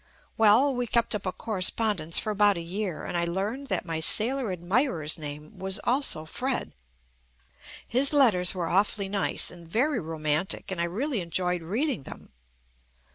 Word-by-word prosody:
Well, 225 Hz, +6 st, +5 dB
we 245 Hz, -1 st, -2 dB
kept 230 Hz, +1 st, +1 dB
up 200 Hz, -2 st, -3 dB
a -, -, 0 dB
cor 220 Hz, +2 st, -5 dB
respondence 185 Hz, -4 st, 0 dB
for 215 Hz, -, -3 dB
about 205 Hz, -2 st, +3 dB
a -, -, -3 dB
year, 180 Hz, -1 st, -4 dB
and -, -, -5 dB
I 170 Hz, 0 st, +1 dB
learned 205 Hz, +11 st, -3 dB
that -, -, -1 dB
my 165 Hz, -2 st, -3 dB
sailor 230 Hz, +7 st, 0 dB
admirer's 175 Hz, -, 0 dB
name 150 Hz, +4 st, -8 dB
was 190 Hz, 0 st, -1 dB
also 245 Hz, -, 0 dB
Fred. 255 Hz, +11 st, -3 dB, 1.1 s
His 260 Hz, +4 st, +3 dB
letters 215 Hz, -, +5 dB
were 175 Hz, -2 st, -2 dB
awfully 200 Hz, +1 st, +1 dB
nice 200 Hz, -1 st, +2 dB
and 170 Hz, -2 st, -13 dB
very 250 Hz, -, +1 dB
roman 155 Hz, 0 st, 0 dB
tic, -, -, -3 dB
and 175 Hz, -3 st, -2 dB
I -, -, +1 dB
really 225 Hz, -, -2 dB
enjoyed 180 Hz, +1 st, -1 dB
reading 235 Hz, -, -1 dB
them. -, -, -11 dB
195 Hz, 170 wpm, -27 LUFS, 170-235 Hz, 1.1 s, Well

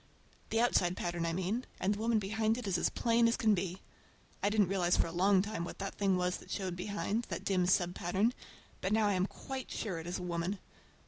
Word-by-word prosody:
The 225 Hz, -, +1 dB
outside 180 Hz, -7 st, +2 dB
pattern 175 Hz, -1 st, -2 dB
I 165 Hz, -, -1 dB
mean, 190 Hz, +7 st, -1 dB, 0.2 s
and 195 Hz, +2 st, +2 dB
the 205 Hz, -, -6 dB
woman 225 Hz, 0 st, +2 dB
behind 220 Hz, +2 st, 0 dB
it 250 Hz, -, -5 dB
is 195 Hz, -3 st, 0 dB
as 175 Hz, -, +2 dB
plain 230 Hz, 0 st, +3 dB
as 230 Hz, -, +1 dB
can 220 Hz, -2 st, +4 dB
be. 185 Hz, -1 st, -2 dB, 0.6 s
I 205 Hz, -, +3 dB
didn't 205 Hz, -3 st, +3 dB
realize 180 Hz, -2 st, +2 dB
for -, -, +3 dB
a 165 Hz, -, -5 dB
long 190 Hz, +2 st, +4 dB
time 210 Hz, -4 st, -3 dB
what 170 Hz, -, -6 dB
the 195 Hz, -, -3 dB
thing 195 Hz, -2 st, +1 dB
was 180 Hz, 0 st, 0 dB
that -, -, -15 dB
showed 185 Hz, -3 st, -3 dB
behind,—that 205 Hz, +4 st, -3 dB
dim 185 Hz, -2 st, +2 dB
sub 180 Hz, -2 st, +3 dB
pattern,—but 190 Hz, +1 st, -2 dB
now 220 Hz, -1 st, +4 dB
I 205 Hz, -, +2 dB
am 185 Hz, +1 st, +1 dB
quite 265 Hz, +3 st, -7 dB
sure 190 Hz, -7 st, -3 dB
it 165 Hz, -, -8 dB
is 175 Hz, -, -2 dB
a 180 Hz, -, -6 dB
woman. 175 Hz, +3 st, -2 dB
195 Hz, 225 wpm, -33 LUFS, 180-215 Hz, 0.6 s, can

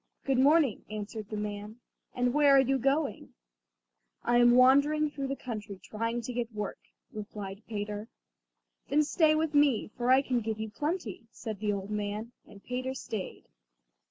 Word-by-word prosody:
"Good 270 Hz, -2 st, +2 dB
morning," 285 Hz, -3 st, +4 dB
answered 215 Hz, 0 st, -6 dB
the 215 Hz, -, -4 dB
old 210 Hz, -, -2 dB
man; 210 Hz, +2 st, -6 dB, 0.4 s
"and 245 Hz, 0 st, +1 dB
where 290 Hz, -1 st, +6 dB
are -, -, +7 dB
you 270 Hz, 0 st, +2 dB
going?" 275 Hz, +5 st, -1 dB, 0.9 s
"I 240 Hz, 0 st, +3 dB
am 240 Hz, 0 st, +6 dB
wandering 285 Hz, +4 st, +5 dB
through 275 Hz, -2 st, -4 dB
the 275 Hz, -, -2 dB
country 215 Hz, -7 st, -6 dB
trying 230 Hz, +4 st, -3 dB
to 250 Hz, -, -5 dB
get 240 Hz, -1 st, -2 dB
work," 210 Hz, -2 st, -5 dB, 0.3 s
replied 205 Hz, -1 st, -7 dB
Peter. 210 Hz, 0 st, -4 dB, 0.8 s
"Then 300 Hz, +2 st, +4 dB
stay 310 Hz, +1 st, +3 dB
with 310 Hz, -1 st, 0 dB
me, 290 Hz, -8 st, +3 dB
for 245 Hz, 0 st, -1 dB
I 260 Hz, +2 st, +6 dB
can 250 Hz, -3 st, 0 dB
give 220 Hz, 0 st, -3 dB
you 220 Hz, -1 st, -4 dB
plenty," 270 Hz, -, -3 dB
said 220 Hz, -3 st, -7 dB
the 210 Hz, 0 st, 0 dB
old 200 Hz, 0 st, -4 dB
man, 210 Hz, +2 st, -3 dB, 0.2 s
and 200 Hz, -, -15 dB
Peter 255 Hz, +1 st, -3 dB
stayed. 215 Hz, -6 st, -6 dB
240 Hz, 170 wpm, -30 LUFS, 210-275 Hz, 0.9 s, are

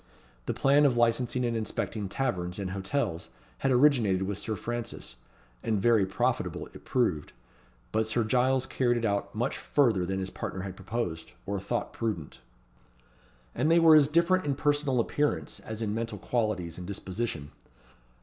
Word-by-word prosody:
The -, -, 0 dB
plan 145 Hz, +2 st, +5 dB
of 125 Hz, -3 st, 0 dB
licensing 120 Hz, +1 st, +2 dB
and 120 Hz, -1 st, -1 dB
inspecting 110 Hz, -2 st, -3 dB
taverns 90 Hz, -7 st, -2 dB
and 95 Hz, -2 st, -3 dB
hotels 95 Hz, -2 st, -2 dB, 0.3 s
had 135 Hz, -, +1 dB
originated 125 Hz, -8 st, +4 dB
with 100 Hz, +1 st, -3 dB
Sir 110 Hz, +1 st, -3 dB
Francis, 120 Hz, +3 st, -5 dB, 0.5 s
and 110 Hz, -3 st, 0 dB
very 110 Hz, -2 st, +4 dB
profitable 95 Hz, -, -1 dB
it -, -, -12 dB
proved. 95 Hz, -, 0 dB, 0.6 s
But 110 Hz, 0 st, +1 dB
Sir 115 Hz, +1 st, +1 dB
Giles 130 Hz, +3 st, +2 dB
carried 120 Hz, -2 st, +1 dB
it 115 Hz, -, -1 dB
out 100 Hz, -2 st, -1 dB
much -, -, -1 dB
further 115 Hz, -10 st, +2 dB
than 95 Hz, +1 st, -1 dB
his 95 Hz, 0 st, -3 dB
partner 95 Hz, -, -5 dB
had 95 Hz, -1 st, -6 dB
proposed, 95 Hz, -4 st, -4 dB
or 100 Hz, 0 st, -2 dB
thought 100 Hz, +5 st, -3 dB
prudent. 105 Hz, -11 st, -4 dB, 1.1 s
And 155 Hz, -, +1 dB
they 165 Hz, -, +5 dB
were 165 Hz, -2 st, +8 dB
as 150 Hz, -2 st, +6 dB
different 170 Hz, +4 st, +3 dB
in 140 Hz, -2 st, 0 dB
personal 145 Hz, -2 st, +1 dB
appearance, 115 Hz, -, -1 dB
as 110 Hz, 0 st, -6 dB
in 105 Hz, -1 st, -1 dB
mental 115 Hz, -1 st, -3 dB
qualities 100 Hz, -7 st, -2 dB
and 90 Hz, -, -7 dB
disposition. 95 Hz, -6 st, -3 dB
115 Hz, 160 wpm, -29 LUFS, 95-130 Hz, 1.1 s, were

